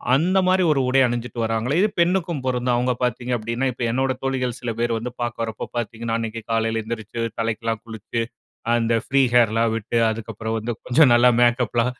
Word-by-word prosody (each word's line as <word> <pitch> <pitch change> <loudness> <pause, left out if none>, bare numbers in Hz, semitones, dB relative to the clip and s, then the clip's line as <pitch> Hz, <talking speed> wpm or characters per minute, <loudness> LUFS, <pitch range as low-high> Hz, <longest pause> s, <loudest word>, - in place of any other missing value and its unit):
அந்த 180 +6 +2
மாதிரி 185 0 +3
ஒரு 135 -3 +2
உடை 135 +1 +4
அணிஞ்சுட்டு 120 0 -4
வர்றாங்கலே 115 +7 0
இது 215 - +3
பெண்ணுக்கும் 170 -3 +1
பொருந்தும். 125 -1 0
அவுங்க 125 +1 +1
பார்த்தீங்க 125 +1 -1
அப்படின்ன 115 +4 -2
இப்ப 120 - -5
என்னோட 130 +2 +1
தோழிகள் 130 -2 -1
சில 120 -1 -2
பேர் 120 0 +1
வந்து 120 +2 -5
பார்க்க 120 -1 -2
வரப்ப 110 -1 -5
பார்த்தீங்கன்னா, 115 0 -3
அன்னைக்கு 115 0 -4
காலையில 115 0 +1
எழுந்திருச்சு 110 0 -6 0.2
தலைக்கெல்லா 115 0 -1
குளிச்சு 115 +1 -4 0.5
அந்த 115 0 +1 0.2
ப்ரீ 135 0 +4
ஹேர்லா 115 -1 +4
விட்டு 115 +1 -2
அதற்கு 115 0 -5
அப்புறம் 110 +2 -3
வந்து 115 +2 -3
கொஞ்சம் 130 +1 +5
நல்லா 120 +1 +6
மேக்கப்லா 120 -1 +2
120 Hz, 180 wpm, -22 LUFS, 115-125 Hz, 0.5 s, நல்லா